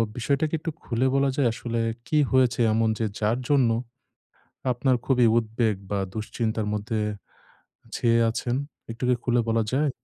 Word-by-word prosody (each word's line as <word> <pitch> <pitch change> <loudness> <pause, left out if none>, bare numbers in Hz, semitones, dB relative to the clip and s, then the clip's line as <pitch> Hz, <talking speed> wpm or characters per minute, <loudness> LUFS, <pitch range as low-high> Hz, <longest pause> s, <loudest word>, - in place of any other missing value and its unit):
বিষয়টাকে 140 +6 0
একটু 165 - -4
খুলে 125 +2 0
বলা 135 0 +3
যায় 135 -3 +2
আসলে 115 -1 -3 0.3
কি 155 - +1
হয়েছে 125 -2 +3
এমন 110 0 +2
যে 115 - +1
যার 110 +4 +1
জন্য 135 -5 +4 1.0
আপনার 130 +1 +1
খুবই 125 -3 +4
উদ্বেগ 110 -1 0 0.2
বা, 100 - 0 0.2
দুশ্চিন্তার 110 0 -2
মধ্যে 110 +1 -2 1.0
ছেয়ে 115 -1 +3
আছেন? 120 +1 -2 0.4
একটু 115 +2 -8
কি 125 - +4
খুলে 120 -1 +2
বলা 115 0 +2
যায়? 145 +2 +2
120 Hz, 150 wpm, -25 LUFS, 115-130 Hz, 1.0 s, জন্য